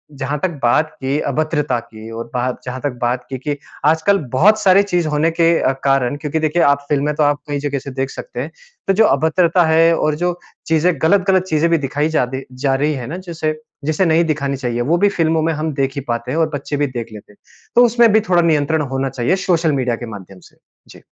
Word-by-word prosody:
जहाँ 140 +2 -3
तक 185 - +2
बात 150 +6 +3
की 135 +3 -1
अभद्रता 150 -3 0
की 115 -1 -12
और 115 +1 -5
बा 125 - -1 0.2
जहाँ 125 +1 -5
तक 145 - -1
बात 125 +1 -1
की 130 - -4
कि, 145 +3 -4 0.3
आजकल 160 +6 +3 0.2
बहुत 210 +11 +4
सारी 195 -1 +5
चीज़ 180 -5 -1
होने 155 +2 +1
के 165 0 +2
अ, - - +2
कारण 135 -1 +2
क्योंकि 150 +2 -2
देखिए 160 +2 +1
आप 140 0 +2
फ़िल्में 145 +1 +1
तो 150 - +2
आप 145 0 +2
कई 145 -1 -2
जगह 140 -1 -2
से 140 - -8
देख 135 +1 -3
सकते - - -8
हैं। - - -6 0.4
तो 195 - +3
जो 220 +3 +4
अभद्रता 165 +4 +3
है 165 +1 +4
और 155 -1 0
जो 175 +2 -1 0.3
चीज़ें 165 +2 +2
गलत-गलत 190 +2 +3
चीज़ें 155 +2 +2
भी 165 - +4
दिखाई 145 +2 -1
जादी 130 +2 -1 0.2
जा 135 -1 +2
रही 150 +3 0
है 125 -4 -5
ना 160 +7 -5
जिसे 160 -4 -4 0.3
जिसे 155 +5 +1
नहीं 165 +1 +3
दिखानी 140 -3 -1
चाहिए, 120 -2 -2
वो 160 +8 +1
भी 205 +3 +3
फ़िल्मों 165 -4 +1
में 165 +1 0
हम 155 0 -3
देख 135 -1 -1
ही 140 - -3
पाते 120 +1 -3
हैं 155 - -2
और 160 -1 +2
बच्चे 145 +1 -3
भी 145 0 +1
देख 120 -3 -5
लेते 105 -1 -12
हैं। - - -27 0.4
तो 245 - +7
उसमें 235 -1 +4
भी 220 - +5
थोड़ा 175 -1 +4
नियंत्रण 160 -1 +1
होना 135 0 -1
चाहिए 125 +7 0
सोशल 170 -4 +2
मीडिया 125 -4 0
के 120 - -7
माध्यम 95 -2 -11
से। - - -30 0.3
जी। - - -14
150 Hz, 235 wpm, -18 LUFS, 135-165 Hz, 0.4 s, तो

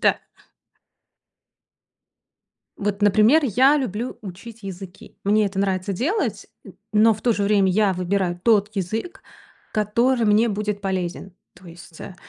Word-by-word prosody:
Да. - - +3 2.6
Вот, 205 0 -3
например, 215 +9 +5
я 265 +5 +4
люблю 245 -2 -4
учить 215 +4 -10
языки. 190 -1 -10
Мне 210 +1 +3
это 195 0 -5
нравится 195 0 -1
делать, 310 - -2 0.2
н - - -12 0.2
но 220 +1 +5
в 210 - -12
то 240 - +3
же 205 - -2
время 200 -2 +3
я 200 +1 +2
выбираю 180 -1 -2
тот 210 -3 +3
язык, 215 - -4 0.5
который 230 +4 +1
мне 215 +3 +3
будет 210 0 -3
полезен. 190 -1 -4 0.2
То 185 - -17
есть, 170 -1 -14
э, 190 - -9
205 Hz, 135 wpm, -22 LUFS, 190-225 Hz, 2.6 s, например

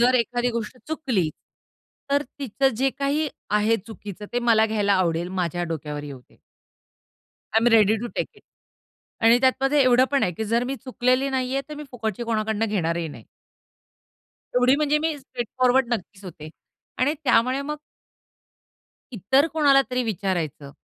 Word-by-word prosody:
जर 250 +2 +4
एखादी 245 +1 0
गोष्ट 235 +1 -5
चुकली, 245 - -1 0.8
तर 285 +1 +3 0.2
तिचं 270 0 +1
जे 270 +2 +2
काही 290 +2 0 0.3
आहे 225 +2 +3
चुकीचं, 210 -2 -9
ते 245 - +1
मला 220 -1 +5
घ्यायला 210 -2 +1
आवडेल. 175 -1 0
माझ्या 175 -2 -2
डोक्यावर 150 -3 -5
येऊदे. 135 -4 -12 1.2
आय 220 - +5
एम 235 - +1
रेडी 220 -1 +5
तो - - -2
टेक - - 0
इट. 420 - -21 0.8
आणि 230 +1 +6
त्यातमध्ये 270 +2 +3
एवढं 255 0 +5
पण 280 - +2
आहे 180 - +1
की 220 +6 -4
जर 230 +3 +1
मी 270 +2 -3
चुकलेली 255 +1 0
नाहीये, 265 +1 -1
तर 300 - -6
मी 300 0 -8
फुकटची 225 -3 -4
कोणाकडून 220 -1 -1
घेणारही 170 -4 -1
नाही. 145 - -11 1.3
एवढी 250 +2 +5
म्हणजे 300 0 +2
मी 315 0 -1
स्ट्रेट 255 -3 -6
फॉरवर्ड 255 0 +4
नक्कीच 200 -1 -8
होते. 155 -4 -9 0.5
आणि 285 +4 +2
त्यामुळे 255 +1 +3
मग 300 +1 -4 1.4
इतर 250 - +2
कोणाला 285 -3 +5
तरी 250 0 0
विचारायचं 175 - -3
235 Hz, 155 wpm, -24 LUFS, 200-265 Hz, 1.4 s, आणि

